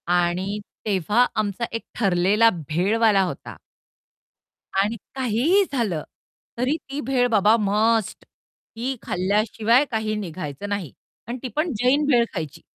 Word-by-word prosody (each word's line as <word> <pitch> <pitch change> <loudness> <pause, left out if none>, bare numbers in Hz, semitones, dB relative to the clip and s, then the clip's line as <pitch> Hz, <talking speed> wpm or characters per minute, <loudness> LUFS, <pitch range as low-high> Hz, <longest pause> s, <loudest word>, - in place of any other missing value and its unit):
आणि 180 +4 0 0.3
तेव्हा 205 +4 +2
आमचा 215 +2 -1
एक 230 - -3
ठरलेला 200 +2 +3 0.2
भेळवाला 200 +5 +3
होता. 180 - -6 1.2
आणि 205 +4 +1 0.2
काहीही 265 - +2
झालं, 205 - -1 0.5
तरी 255 +5 +1
ती 280 +2 -4
भेळ 250 -2 +2
बाबा 215 +1 +5
मस्ट 215 +1 +1
ती 250 +4 -8
खाल्ल्याशिवाय 215 +7 +2
काही 220 -1 -1
निघायचं 185 -2 -5
नाही 195 -9 -3 0.4
आणि 240 - -4
ती - - -2
पण 310 +2 0
जैन 270 +5 +3
भेळ 245 -5 +4
खायची. 160 -2 -5
215 Hz, 120 wpm, -23 LUFS, 190-245 Hz, 1.2 s, बाबा